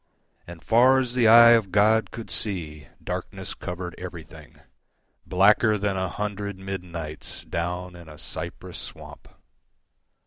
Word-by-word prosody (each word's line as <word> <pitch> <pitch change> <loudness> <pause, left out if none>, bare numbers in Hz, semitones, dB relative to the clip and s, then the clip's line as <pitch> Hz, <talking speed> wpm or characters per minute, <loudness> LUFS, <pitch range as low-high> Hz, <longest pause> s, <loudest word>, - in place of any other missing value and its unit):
And 85 -1 -11
far 125 +3 +5
as 125 -2 -2
the 125 -3 +3
eye 115 +1 +9
of 110 -5 +3
God 110 +3 +3
could 115 - -9
seeDarkness 80 -8 -5
covered 90 -1 -6
everything, 85 -4 -10 0.7
Blacker 105 +3 +4
than 100 -1 -1
a 95 -1 -2
hundred 105 -1 -4
midnightsDown 90 -1 -6
in 85 -2 -13
a 75 - -12
cypress - - -7
swamp. - - -10
95 Hz, 115 wpm, -25 LUFS, 85-110 Hz, 0.7 s, eye